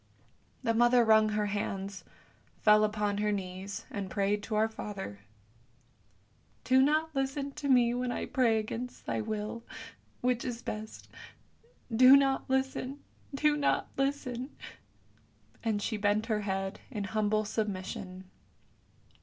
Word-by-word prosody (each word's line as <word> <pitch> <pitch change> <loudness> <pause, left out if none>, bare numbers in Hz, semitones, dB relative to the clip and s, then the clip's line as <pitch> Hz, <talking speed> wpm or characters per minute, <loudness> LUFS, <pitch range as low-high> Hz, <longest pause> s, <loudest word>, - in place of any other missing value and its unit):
" - - -37
The 230 - +2
mother 240 +1 +5
wrung 220 -1 +5
her 210 0 0
hands, 200 -1 -3 0.6
fell 210 0 +6
upon 210 -1 0
her 210 0 +1
knees, 190 0 -5
and 200 -2 -4
prayed 200 +2 0
to 215 +1 -4
Our 215 +1 +3
Father, 200 - -7 0.7
" 100 -3 -37
Do 260 +1 +4
not 310 +3 +2
listen 275 +1 -2
to 280 +1 -4
me 240 -2 +5
when 250 0 -1
I - - -3
pray 235 -4 +2
against 230 +3 -5
thy - - -1
will, 215 +1 -4 0.6
which 250 -1 +1
is 245 -2 -5
best; 215 +1 -6 0.9
do 255 +3 +9
not 270 -1 +1
listen, 265 +1 -1 0.3
do 300 +1 +3
not 290 -1 +1
listen! 270 -2 -2 0.6
" - - -33
And 220 -3 0
she 220 - -1
bent 205 +1 +1
her 215 -2 0
head 195 0 -3
in 215 -6 -4
humble 215 +2 0
submission. 190 -3 -4
220 Hz, 140 wpm, -30 LUFS, 205-255 Hz, 0.9 s, do